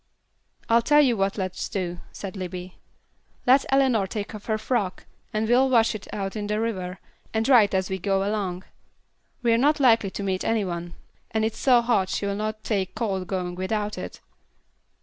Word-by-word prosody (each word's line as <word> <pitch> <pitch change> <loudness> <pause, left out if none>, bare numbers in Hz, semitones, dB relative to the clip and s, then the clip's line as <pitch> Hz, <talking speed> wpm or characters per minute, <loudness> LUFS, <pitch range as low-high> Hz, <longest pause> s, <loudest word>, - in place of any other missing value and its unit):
"I'll 230 +1 +4
tell 295 +5 +5
you 250 -4 +3
what 195 0 0
let's 185 -2 -3
do," 175 -3 -3
said 195 0 -7
Libbie. 180 -1 -6 0.7
"Let 260 +2 +5
Eleanor 260 -7 +3
take 205 +2 -5
off 210 -1 -9
her 220 -1 +1
frock, 215 -5 -2 0.3
and 215 +1 -1
we'll 255 +3 +4
wash 230 -3 +4
it 210 -2 -7
out 195 0 -4
in 210 -1 -3
the 210 +1 0
river, 185 -5 -3 0.4
and 220 0 +1
dry 245 -5 +7
it 200 - -4
as 190 0 +1
we 190 0 -3
go 195 +1 0
along. 190 -4 -2 0.8
We're 230 -1 +4
not 295 +4 +3
likely 230 -6 +4
to 200 - -5
meet 190 -1 -1
any 225 -3 +1
one, 170 -1 -5 0.3
and 220 0 0
it's 220 - -3
so 250 -3 +5
hot 210 -6 +2
she'll 200 0 -1
not 215 +1 -3
take 190 -4 -1
cold 190 -6 -2
going 180 -2 -2
without 205 +3 -2
it. - - -7
210 Hz, 190 wpm, -25 LUFS, 190-230 Hz, 0.8 s, dry